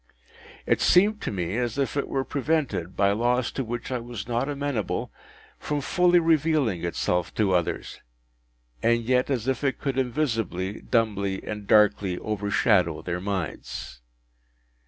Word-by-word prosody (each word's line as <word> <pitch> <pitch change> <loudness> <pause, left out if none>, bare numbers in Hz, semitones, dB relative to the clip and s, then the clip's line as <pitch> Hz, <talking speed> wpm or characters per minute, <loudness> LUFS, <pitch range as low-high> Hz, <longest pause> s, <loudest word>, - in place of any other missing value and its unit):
It - - +2
seemed 210 +4 +4
to - - -3
me 95 +1 -2
as 120 0 -1
if 140 0 -1
it 140 - -1
were 135 - -1
prevented, 140 - -1
by 100 0 +4
laws 120 +3 +1
to 135 - -3
which 120 +2 -5
I 125 - -1
was 115 -3 -7
not 120 +3 -1
amenable, 140 -7 -2 0.5
from 150 -1 -2
fully 180 +5 +3
revealing 155 - +2
itself 85 +1 -1
to 100 -3 +2
others, 85 -2 -2 0.8
and 115 0 +2
yet 125 +3 +1
as 130 -3 -1
if 135 +1 -1
it 135 -2 +1
could 135 -2 -2
invisibly, 115 - -1
dumbly, 100 -5 0
and 105 -2 -6
darkly 105 -3 +4
overshadow 100 -6 +1
their 90 +1 -3
minds. 95 -10 -5
115 Hz, 145 wpm, -26 LUFS, 100-135 Hz, 0.8 s, seemed